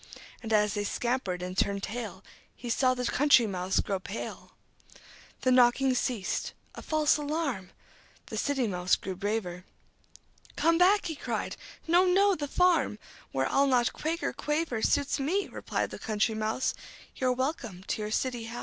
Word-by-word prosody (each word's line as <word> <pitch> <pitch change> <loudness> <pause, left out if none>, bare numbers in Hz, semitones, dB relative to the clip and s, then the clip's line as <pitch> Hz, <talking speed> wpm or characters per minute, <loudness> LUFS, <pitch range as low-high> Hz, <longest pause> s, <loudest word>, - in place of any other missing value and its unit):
And 225 - -6
as 210 -1 +3
they 205 - -1
scampered 205 -5 -2
and 180 0 -5
turned 200 +1 0
tail, 215 -4 -5 0.3
He 240 -1 -5
saw 255 +2 +3
the 250 0 -3
Country 270 -2 +5
Mouse 185 -2 -1
grow 195 -2 -2
pale. 200 +4 -7 0.9
The 255 - +2
knocking 255 +1 +5
ceased. 245 -5 -2 0.2
A - - -9
false 310 -2 +2
alarm! 290 - -2 0.6
The - - -6
City 275 -3 0
Mouse 180 -3 +1
grew 190 -1 -6
braver. 190 -3 -3 0.9
"Come 330 +1 +3
back!" 395 +3 +5
he 320 - -3
cried. - - -3 0.3
"No, 345 +2 +5
no! 390 +2 +4
The 295 -5 -3
farm, 350 -8 +2 0.3
Where 135 0 0
I'll 280 +1 +3
not 245 -3 +2
quake 330 +2 -3
or - - -1
quaver, 295 -6 -1
Suits 285 +3 +1
me," 360 +9 0
replied - - -3
the - - -7
Country 220 0 0
Mouse. 220 +3 -1 0.4
"You're 255 -1 +2
welcome 250 - -3
to 215 - -3
your 210 - -3
city 240 +1 -1
house." 235 +1 -6
245 Hz, 165 wpm, -29 LUFS, 205-290 Hz, 0.9 s, Country